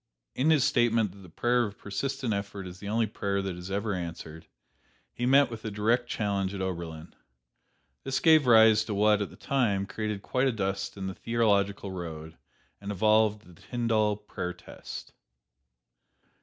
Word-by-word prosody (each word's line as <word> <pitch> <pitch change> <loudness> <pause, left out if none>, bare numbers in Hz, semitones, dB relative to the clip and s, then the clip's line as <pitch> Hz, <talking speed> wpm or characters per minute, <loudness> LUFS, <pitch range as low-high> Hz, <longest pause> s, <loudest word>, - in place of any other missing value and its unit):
In 140 +5 +1
his 155 -4 +4
statement 115 -6 +2
that 100 - -15
the 95 -2 -13
prayer 120 +8 +1
of 105 -3 -5
persistent 130 +4 -3
effort 100 -1 -4
is 90 0 -9
the 100 - -6
only 115 +1 +2
prayer 100 -1 -2
that 95 -2 -3
is 90 +1 -8
ever 100 +2 -1
answered, 85 -3 -6 0.7
he 120 - -2
met 135 0 +5
with 115 -1 -7
a 110 - -3
direct 115 +4 0
challenge 100 -2 -1
at - - -5
Oberlin. 85 -3 -5 0.9
This 135 -1 -1
gave 155 -4 +5
rise 110 -2 +7
to 105 - -3
what, 105 0 +3
at 100 - -2
the - - -14
time, 110 -8 0
created 105 0 -4
quite 130 +1 +1
a - - +2
dust 95 -2 -3
in 95 - -5
the 95 - -3
theological 100 -3 0
road, 80 -3 -7 0.5
and 100 0 -5
evolved 110 +1 +3
"The 90 -2 -17
Tyndall 110 -4 0
Prayer 95 -4 -5
Test." 90 -1 -10
105 Hz, 170 wpm, -28 LUFS, 95-115 Hz, 0.9 s, rise